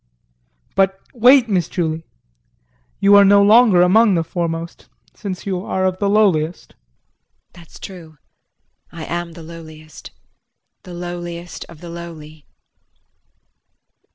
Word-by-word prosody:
But 195 Hz, 0 st, +1 dB
wait, 250 Hz, +1 st, +5 dB
Miss 185 Hz, -6 st, 0 dB
Julie 160 Hz, -2 st, -3 dB, 0.9 s
you 200 Hz, +1 st, +4 dB
are 200 Hz, -, +8 dB
no 200 Hz, 0 st, +5 dB
longer 210 Hz, -3 st, +6 dB
among 205 Hz, +2 st, +4 dB
the 165 Hz, -, +1 dB
foremost 170 Hz, 0 st, -5 dB, 0.3 s
since 190 Hz, -3 st, -7 dB
you 185 Hz, -2 st, -3 dB
are 190 Hz, -2 st, -2 dB
of 185 Hz, 0 st, -1 dB
the 200 Hz, -, 0 dB
lowliest. 180 Hz, -6 st, +1 dB
JULIE. -, -, -33 dB, 0.7 s
That's 170 Hz, -3 st, -15 dB
true, 165 Hz, -5 st, -11 dB, 0.7 s
I 165 Hz, -2 st, -8 dB
am 170 Hz, 0 st, -4 dB
the 165 Hz, -, -11 dB
lowliest 155 Hz, -1 st, -12 dB, 0.7 s
the 180 Hz, -, -11 dB
lowliest 175 Hz, 0 st, -7 dB
of 165 Hz, -3 st, -14 dB
the 175 Hz, -, -9 dB
lowly. 155 Hz, -3 st, -10 dB
175 Hz, 125 wpm, -19 LUFS, 165-195 Hz, 0.9 s, are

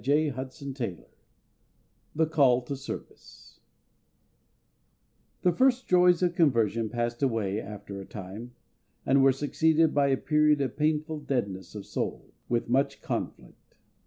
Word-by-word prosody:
CHAPTER 140 Hz, -1 st, -1 dB, 0.2 s
II 90 Hz, -7 st, -5 dB, 1.1 s
THE 160 Hz, +1 st, +3 dB
CALL 135 Hz, -6 st, +3 dB
TO 140 Hz, +3 st, -4 dB
SERVICE 135 Hz, +1 st, -10 dB, 1.8 s
THE 180 Hz, -, +4 dB
first 255 Hz, +5 st, +2 dB
joys 180 Hz, -1 st, +4 dB
of 175 Hz, -1 st, +2 dB
conversion 115 Hz, -, +2 dB
passed 120 Hz, +2 st, -3 dB
away 110 Hz, -6 st, 0 dB
after 100 Hz, -1 st, -8 dB
a -, -, -9 dB
time, 105 Hz, +6 st, -9 dB, 0.5 s
and 135 Hz, +1 st, +4 dB
were 135 Hz, 0 st, +6 dB
succeeded 155 Hz, +3 st, +2 dB
by 140 Hz, -1 st, +3 dB
a 135 Hz, -1 st, +2 dB
period 150 Hz, 0 st, +3 dB
of 135 Hz, -2 st, -2 dB
painful 155 Hz, +1 st, 0 dB
deadness 100 Hz, -, -3 dB
of 105 Hz, -, -7 dB
soul, -, -, -4 dB, 0.2 s
with 120 Hz, -1 st, 0 dB
much 135 Hz, +4 st, 0 dB
conflict. -, -, -6 dB
135 Hz, 130 wpm, -28 LUFS, 115-155 Hz, 1.8 s, were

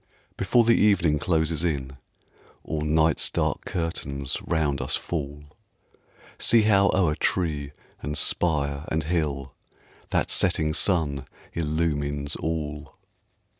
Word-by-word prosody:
Before 115 Hz, +5 st, +3 dB
the 115 Hz, +1 st, +4 dB
evening 85 Hz, -8 st, +3 dB
closes 80 Hz, -1 st, 0 dB
in, 70 Hz, -5 st, -2 dB, 0.7 s
Or 80 Hz, -1 st, -3 dB
night's 80 Hz, +1 st, +2 dB
dark -, -, -1 dB
curtains 70 Hz, -5 st, -3 dB
round 75 Hz, -4 st, 0 dB
us 65 Hz, -, 0 dB
fall, 75 Hz, -3 st, -4 dB, 1.0 s
See 115 Hz, -2 st, +5 dB
how 100 Hz, -2 st, +4 dB
o'er 90 Hz, -5 st, +3 dB
tree, 75 Hz, -4 st, -1 dB, 0.3 s
and 75 Hz, 0 st, -3 dB
spire, 70 Hz, -3 st, +1 dB
and 80 Hz, 0 st, -1 dB
hill, 75 Hz, -5 st, -2 dB, 0.6 s
That -, -, 0 dB
setting 75 Hz, -1 st, +2 dB
sun 75 Hz, -7 st, +1 dB, 0.3 s
illumines 75 Hz, -3 st, -1 dB
all. 75 Hz, -3 st, -4 dB
75 Hz, 110 wpm, -25 LUFS, 70-85 Hz, 1.0 s, See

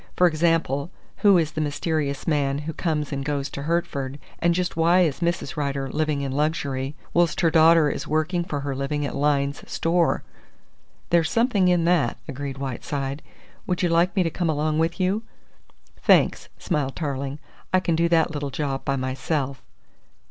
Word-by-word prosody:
For 180 Hz, -, +4 dB
example, 165 Hz, -3 st, +1 dB, 0.3 s
who 200 Hz, -3 st, +5 dB
is 160 Hz, -3 st, +1 dB
the 155 Hz, -, -3 dB
mysterious 150 Hz, -1 st, -2 dB
man 140 Hz, -3 st, +1 dB
who 160 Hz, -, -3 dB
comes 155 Hz, -4 st, -2 dB
and 135 Hz, 0 st, -2 dB
goes 140 Hz, -1 st, -2 dB
to 140 Hz, -, -5 dB
Hertford, 140 Hz, -4 st, -2 dB, 0.2 s
and 170 Hz, 0 st, +2 dB
just 180 Hz, 0 st, -1 dB
why 170 Hz, +3 st, +4 dB
is 155 Hz, -6 st, +1 dB
Mrs. 170 Hz, -5 st, -1 dB
Rider 140 Hz, -2 st, -2 dB
living 150 Hz, -2 st, 0 dB
in 135 Hz, -1 st, -3 dB
luxury 140 Hz, -2 st, -1 dB, 0.2 s
whilst 170 Hz, -2 st, +2 dB
her 165 Hz, -2 st, +3 dB
daughter 160 Hz, -1 st, +6 dB
is -, -, -3 dB
working 155 Hz, +3 st, 0 dB
for 145 Hz, -4 st, -4 dB
her 140 Hz, -1 st, -3 dB
living 140 Hz, +2 st, -2 dB
at -, -, -4 dB
Lyne's 140 Hz, -1 st, +1 dB
Store?" 170 Hz, 0 st, +1 dB, 0.9 s
"There's 170 Hz, -2 st, +3 dB
something 230 Hz, -5 st, +2 dB
in 175 Hz, -2 st, +3 dB
that," 175 Hz, -3 st, +2 dB
agreed 140 Hz, -1 st, -5 dB
Whiteside. 135 Hz, +1 st, -4 dB, 0.5 s
"Would 180 Hz, 0 st, -1 dB
you 175 Hz, -, +3 dB
like 170 Hz, +3 st, +2 dB
me 190 Hz, -, +3 dB
to 165 Hz, -, -1 dB
come 175 Hz, 0 st, -1 dB
along 155 Hz, 0 st, 0 dB
with 165 Hz, +3 st, 0 dB
you?" 190 Hz, +4 st, +1 dB, 0.8 s
"Thanks," -, -, +3 dB
smiled 145 Hz, -6 st, -2 dB
Tarling, 140 Hz, -2 st, -3 dB, 0.3 s
"I 185 Hz, -, +4 dB
can 170 Hz, -3 st, 0 dB
do 170 Hz, +1 st, +2 dB
that 165 Hz, -1 st, +3 dB
little 145 Hz, -2 st, -3 dB
job 135 Hz, -1 st, -3 dB
by 135 Hz, -, 0 dB
myself." 135 Hz, +1 st, -2 dB
155 Hz, 175 wpm, -24 LUFS, 140-170 Hz, 0.9 s, daughter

